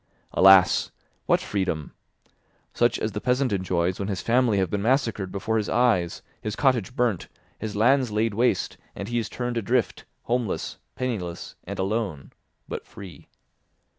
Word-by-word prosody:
Alas! 95 -1 +6 0.4
What - - +3
freedom? 90 -7 -2 0.8
Such - - +2
as - - -2
the - - -4
peasant 125 -1 +1
enjoys 90 -1 0
when 100 - -2
his 100 -3 -2
family 120 -3 +3
have 95 -3 0
been 100 - -1
massacred 115 -5 +1
before 110 +3 -1
his 105 - -1
eyes, 115 -9 +2 0.2
his 105 0 -3
cottage 125 -4 +1
burnt, 120 -8 0 0.3
his 110 -1 -5
lands 125 +4 +3
laid 110 +1 +1
waste, 120 +4 +1 0.2
and 100 +2 -5
he 120 0 0
is 115 - -3
turned 125 -1 -3
adrift, 115 +1 0 0.2
homeless, 120 -3 -2 0.2
penniless, 105 -10 -4
and - - -6
alone, 95 -7 -2 0.3
but - - -5
free. 95 -4 -11
110 Hz, 150 wpm, -25 LUFS, 95-120 Hz, 0.8 s, Alas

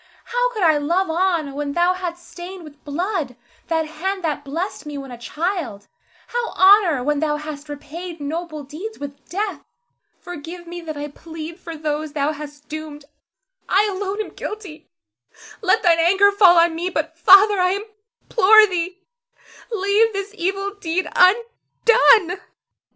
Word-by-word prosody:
How - - 0
could 430 -5 -3
I 315 -3 +4
love 340 +5 0
on 335 -4 0
when 285 0 -3
thou 350 +2 +3
hadst 350 -1 -6
stained 360 +1 -9
with 300 -1 -14
blood 315 - -3 0.3
that 320 -1 0
hand 370 +5 -4
that 300 -3 -2
blessed 330 +8 -4
me 295 -1 -6
when 270 -2 -8
a 245 - -8
child, 300 - -3 0.4
how 480 -1 -3
honor 375 -8 +5
when 295 +1 0
thou 300 -1 0
hadst 300 -1 -8
repaid 325 +4 -8
noble 310 +1 -5
deeds 340 +11 -8
with 285 0 -9
death? 405 +3 -3 0.6
Forgive 345 0 -9
me 345 +1 -7
that 310 -3 -7
I 290 0 -4
plead 325 +3 -9
for 330 -2 -8
those 305 0 -3
thou 295 0 0
hast 295 -1 -10
doomed! 305 -2 -8 0.6
I 410 +2 +3
alone 390 +1 -4
am - - -6
guilty, 380 -8 -8 0.7
let 375 -3 +2
thine 335 -2 +4
anger 385 +4 +5
fall 380 -4 +6
on 335 0 +4
me; 345 +3 -2
but, 325 -2 -3
Father, 390 +4 +6
I 365 +2 +2 0.4
implore 435 0 +6
thee, 365 -1 -4 0.7
leave 425 +2 +2
this 395 +1 -4
evil 390 +1 -2
deed 355 +1 -1
undone. 450 -1 +3
345 Hz, 155 wpm, -21 LUFS, 305-385 Hz, 0.7 s, fall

